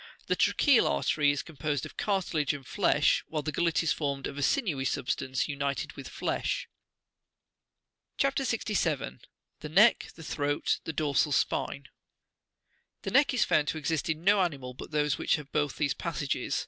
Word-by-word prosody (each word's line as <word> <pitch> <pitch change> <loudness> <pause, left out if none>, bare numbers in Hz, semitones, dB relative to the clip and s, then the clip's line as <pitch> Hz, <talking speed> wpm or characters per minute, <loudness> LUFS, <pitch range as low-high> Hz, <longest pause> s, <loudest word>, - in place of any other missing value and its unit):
The - - +1
tracheal 280 -6 +4
artery 145 -2 +2
is 145 - 0
composed 150 -3 -3
of - - -11
cartilage 175 -8 0
and 135 -2 -10
flesh, - - +2
while 155 -2 -3
the 155 - -2
gullet 170 +2 +1
is 165 - +2
formed 140 -3 -3
of - - -5
a 145 - -4
sinewy 155 - +1
substance 130 -1 -1
united 140 -1 -3
with - - -9
flesh. - - -2 1.5
CHAP. 275 0 +1
67. 205 - -1 0.4
THE 150 - -7
KECK; 210 +9 +4
THE 165 - -12
THROAT; 145 -1 -1
THE 160 - -4
DORSAL 150 0 +1
SPIXE. 70 - -1 1.1
The - - -3
neck - - +4
is - - +3
found 150 -1 +2
to 160 - -1
exist 155 +1 -2
in 160 +1 -2
no 200 +1 +5
animal 140 -8 -2
but - - -9
those 150 -1 0
which - - +2
have 150 -2 -8
both 145 -2 0
these 145 -2 +1
passages. 150 -5 -2
150 Hz, 165 wpm, -29 LUFS, 140-165 Hz, 1.5 s, no